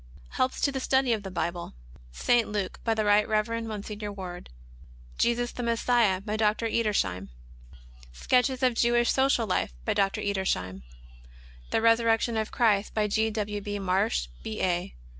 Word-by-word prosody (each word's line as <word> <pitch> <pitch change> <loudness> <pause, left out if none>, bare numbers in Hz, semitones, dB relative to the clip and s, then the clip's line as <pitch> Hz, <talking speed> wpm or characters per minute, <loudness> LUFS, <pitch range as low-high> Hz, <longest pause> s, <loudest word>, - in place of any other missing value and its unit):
Helps 255 0 -1
to 280 - +2
the 270 - -3
Study 265 -1 +2
of 220 - -2
the 195 - -7
Bible. 170 - -4 0.4
St. 235 - +2
Luke, 205 -3 -3
by 225 -1 +1
the 215 -1 0
Right 205 0 +4
Kev. 215 -1 +1
Mgr. 215 -2 -5
Ward. 180 -2 -8 0.7
Jesus 240 0 +1
the - - -6
Messiah, 230 -4 +2
by 210 +1 -3
Dr. 215 +1 +1
Edersheim. 200 - 0 0.8
Sketches 255 - +1
of 250 -1 +4
Jewish 240 +1 +2
Social 265 -3 +2
Life, 185 - -1
by - - +1
Dr. 195 -1 0
Edersheim. 185 - -2 0.9
The 225 - 0
Resurrection 230 0 +3
of 220 -1 -1
Christ, 215 -4 +1
by 215 -1 +2
G. 220 +2 +1
W. 210 -1 -3
B. 205 0 -4
Marsh, 190 - 0
B. 110 - -5
A. 175 - -1
215 Hz, 160 wpm, -27 LUFS, 195-235 Hz, 0.9 s, Right